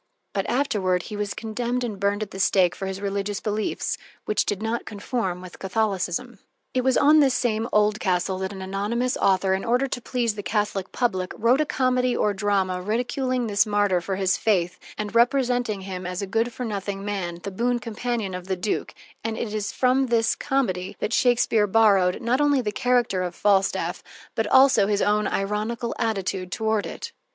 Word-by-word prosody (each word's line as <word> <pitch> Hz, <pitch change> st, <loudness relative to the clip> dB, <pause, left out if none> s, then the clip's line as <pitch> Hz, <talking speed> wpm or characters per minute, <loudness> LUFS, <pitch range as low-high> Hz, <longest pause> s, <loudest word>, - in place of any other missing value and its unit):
But -, -, -1 dB
afterward 195 Hz, -9 st, +1 dB
he 210 Hz, -, -7 dB
was 205 Hz, -1 st, -3 dB
condemned 240 Hz, +3 st, -2 dB
and 215 Hz, -5 st, -4 dB
burned 200 Hz, +1 st, +1 dB
at 205 Hz, -, -9 dB
the 190 Hz, -, -7 dB
stake 185 Hz, -2 st, +3 dB
for 195 Hz, -, -5 dB
his 190 Hz, 0 st, -4 dB
religious 200 Hz, 0 st, -2 dB
beliefs, 210 Hz, 0 st, -2 dB, 0.3 s
which 210 Hz, -, 0 dB
did 205 Hz, -, -1 dB
not 225 Hz, +1 st, -1 dB
conform 200 Hz, -3 st, -3 dB
with 185 Hz, -1 st, -11 dB
Catholicism. 200 Hz, +2 st, -1 dB, 0.3 s
It 255 Hz, -, +1 dB
was 260 Hz, 0 st, +3 dB
on 300 Hz, +2 st, +6 dB
this 270 Hz, -4 st, +4 dB
same 230 Hz, -1 st, 0 dB
Oldcastle 195 Hz, -3 st, +1 dB
that 190 Hz, 0 st, -3 dB
an 190 Hz, -1 st, -7 dB
anonymous 210 Hz, +6 st, -1 dB
author, 190 Hz, 0 st, +2 dB
in 190 Hz, -, -1 dB
order 245 Hz, +3 st, +2 dB
to 255 Hz, -2 st, -4 dB
please 235 Hz, -2 st, -1 dB
the 205 Hz, -, -6 dB
Catholic 200 Hz, -1 st, -1 dB
public, 190 Hz, -7 st, -1 dB
wrote 245 Hz, +6 st, +3 dB
a 305 Hz, -, 0 dB
comedy 255 Hz, -2 st, +1 dB
or 210 Hz, -, +2 dB
drama, 190 Hz, -2 st, 0 dB
ridiculing 245 Hz, +4 st, -1 dB
this 205 Hz, -1 st, +2 dB
martyr 205 Hz, -3 st, +2 dB
for 190 Hz, +2 st, -3 dB
his 190 Hz, -1 st, +1 dB
faith 180 Hz, -5 st, +1 dB, 0.2 s
and 210 Hz, 0 st, -4 dB
representing 245 Hz, -3 st, +2 dB
him 185 Hz, -1 st, -5 dB
as 180 Hz, +2 st, -3 dB
a -, -, -1 dB
good 225 Hz, +5 st, 0 dB
for 250 Hz, +1 st, -5 dB
nothing 200 Hz, -2 st, -4 dB
man, 190 Hz, -4 st, -3 dB
the 200 Hz, -, -4 dB
boon 240 Hz, +5 st, 0 dB
companion 230 Hz, -3 st, -3 dB
of 180 Hz, 0 st, -6 dB
the 190 Hz, -1 st, -1 dB
duke, 200 Hz, +4 st, -2 dB, 0.3 s
and 225 Hz, 0 st, -2 dB
it 215 Hz, -2 st, -3 dB
is 210 Hz, 0 st, -2 dB
from 260 Hz, +1 st, +2 dB
this 230 Hz, -2 st, +2 dB
comedy 205 Hz, -10 st, -1 dB
that 225 Hz, -, -2 dB
Shakespeare 235 Hz, -4 st, +3 dB
borrowed, 195 Hz, -4 st, +4 dB
not 250 Hz, +4 st, +2 dB
only 290 Hz, -2 st, +3 dB
the 210 Hz, -3 st, -2 dB
character 240 Hz, -4 st, +1 dB
of 180 Hz, -1 st, -3 dB
Falstaff, 195 Hz, -2 st, +1 dB, 0.3 s
but 225 Hz, -1 st, -1 dB
also 260 Hz, -5 st, +5 dB
his 205 Hz, -1 st, +1 dB
own 210 Hz, 0 st, +2 dB
ironical 215 Hz, +4 st, -2 dB
attitude 195 Hz, -4 st, -2 dB
toward 220 Hz, -2 st, 0 dB
it. 465 Hz, -, -7 dB
210 Hz, 190 wpm, -24 LUFS, 195-240 Hz, 0.3 s, on